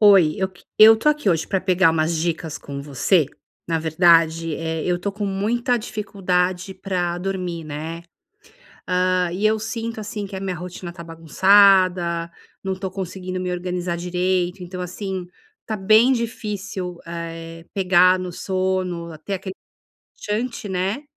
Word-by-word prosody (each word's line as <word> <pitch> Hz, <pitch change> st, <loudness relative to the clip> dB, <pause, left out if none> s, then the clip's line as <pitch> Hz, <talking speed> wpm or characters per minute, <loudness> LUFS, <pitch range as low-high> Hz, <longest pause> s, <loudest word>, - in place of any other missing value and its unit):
Oi, 195 Hz, -7 st, +6 dB
eu 190 Hz, -1 st, 0 dB
que 190 Hz, -2 st, -21 dB
eu 220 Hz, +1 st, +9 dB
tô 225 Hz, +7 st, +1 dB
aqui 300 Hz, -7 st, +1 dB
hoje 165 Hz, -2 st, 0 dB
pra 190 Hz, -, 0 dB
pegar 185 Hz, -2 st, +4 dB
umas 160 Hz, +1 st, 0 dB
dicas 160 Hz, -1 st, -2 dB
com 140 Hz, -1 st, -7 dB
você, 150 Hz, +4 st, +2 dB, 0.4 s
na 165 Hz, -1 st, +1 dB
verdade, 165 Hz, 0 st, +3 dB
eh, 160 Hz, -1 st, -3 dB
eu 180 Hz, -1 st, 0 dB
tô 200 Hz, +3 st, -3 dB
com 205 Hz, 0 st, -3 dB
muita 230 Hz, +6 st, 0 dB
dificuldade 190 Hz, -4 st, -1 dB
pra 175 Hz, -3 st, -2 dB
dormir, 180 Hz, -3 st, -3 dB
né, 155 Hz, +3 st, -6 dB, 0.9 s
hã, 180 Hz, -1 st, +2 dB
e 195 Hz, +4 st, -1 dB
eu 215 Hz, +1 st, +4 dB
sinto, 225 Hz, +1 st, -4 dB
assim, 210 Hz, -1 st, -5 dB
que 195 Hz, -, -8 dB
a -, -, -4 dB
minha 190 Hz, -2 st, -2 dB
rotina 180 Hz, 0 st, -7 dB
tá 170 Hz, -1 st, -9 dB
bagunçada, 175 Hz, +1 st, +4 dB, 0.3 s
não 190 Hz, -1 st, -2 dB
tô 190 Hz, 0 st, -5 dB
conseguindo 185 Hz, -1 st, -5 dB
me 180 Hz, 0 st, -2 dB
organizar 180 Hz, 0 st, -2 dB
direito, 180 Hz, +1 st, -1 dB
então 180 Hz, +1 st, -6 dB
assim, 185 Hz, 0 st, -5 dB, 0.4 s
tá 220 Hz, -, -3 dB
bem 215 Hz, +6 st, +5 dB
difícil, 210 Hz, -6 st, -4 dB
eh, 165 Hz, 0 st, -7 dB
pegar 185 Hz, -1 st, +4 dB
no 180 Hz, -1 st, -5 dB
sono, 185 Hz, -2 st, -2 dB
a -, -, -10 dB
ter 175 Hz, +6 st, -6 dB
aque 190 Hz, 0 st, -6 dB, 0.8 s
relaxante, 225 Hz, +1 st, -2 dB
né. 190 Hz, +8 st, -1 dB
185 Hz, 155 wpm, -22 LUFS, 170-195 Hz, 0.9 s, eu